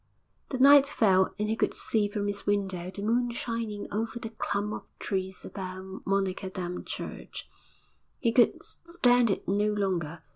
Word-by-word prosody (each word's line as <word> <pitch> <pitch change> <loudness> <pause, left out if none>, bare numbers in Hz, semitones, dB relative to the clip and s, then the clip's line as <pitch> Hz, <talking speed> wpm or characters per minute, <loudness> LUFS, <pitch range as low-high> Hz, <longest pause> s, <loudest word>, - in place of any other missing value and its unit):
The 260 - -2
night 280 +1 +8
fell 190 -8 +3
and 210 0 -1
he 220 - 0
could - - 0
see 215 -2 0
from 205 0 -2
his 205 0 -4
window 190 -3 0
the 200 +2 -6
moon 240 +3 +2
shining 230 -3 -3
over 225 +2 -2
the 225 -1 -6
clump 210 -1 -2
of - - -5 0.2
trees 190 -1 -3
about 190 0 -7
Monnickendam 185 -2 -2
church - - -6 0.7
he 230 - +1
could 240 +1 +3
stand 245 -9 +2
it 195 - -2
no 205 +2 +2
longer. 175 -6 -2
205 Hz, 155 wpm, -28 LUFS, 190-230 Hz, 0.7 s, night